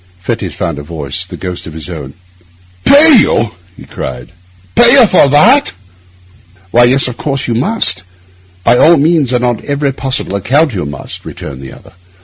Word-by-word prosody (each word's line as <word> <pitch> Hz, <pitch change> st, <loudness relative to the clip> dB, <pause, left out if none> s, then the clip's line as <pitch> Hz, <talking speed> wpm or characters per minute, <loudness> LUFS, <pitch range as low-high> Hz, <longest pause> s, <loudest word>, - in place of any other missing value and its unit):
Fettes 90 Hz, -, -5 dB
found 80 Hz, -4 st, -4 dB
a -, -, -7 dB
voice, 75 Hz, -2 st, -5 dB
the -, -, -10 dB
ghost 90 Hz, -2 st, -7 dB
of 80 Hz, -, -9 dB
his 80 Hz, -3 st, -6 dB
own: 70 Hz, 0 st, -9 dB, 0.7 s
'Pay 295 Hz, -1 st, +7 dB
you!' 115 Hz, -, +1 dB, 0.3 s
he -, -, -13 dB
cried. 60 Hz, -1 st, -8 dB, 0.4 s
'Pay 240 Hz, +1 st, +6 dB
you 265 Hz, -4 st, +7 dB
for 185 Hz, -7 st, +3 dB
that?' 205 Hz, -, +3 dB, 1.0 s
'Why, 120 Hz, +1 st, +4 dB
yes, 130 Hz, +2 st, +2 dB
of 125 Hz, -, -7 dB
course 140 Hz, -2 st, -3 dB
you 120 Hz, -, -1 dB
must. 130 Hz, -, +1 dB, 0.6 s
By 120 Hz, +5 st, +3 dB
all 170 Hz, +1 st, +5 dB
means 150 Hz, -3 st, +1 dB
and 125 Hz, -1 st, 0 dB
on 120 Hz, -2 st, -2 dB
every 140 Hz, -1 st, -2 dB
possible 130 Hz, -7 st, -4 dB
account, 135 Hz, -, 0 dB
you 90 Hz, -7 st, -4 dB
must,' 70 Hz, -2 st, -9 dB
returned 65 Hz, -1 st, -9 dB
the 65 Hz, -, -10 dB
other. -, -, -17 dB
125 Hz, 175 wpm, -11 LUFS, -, 1.0 s, Pay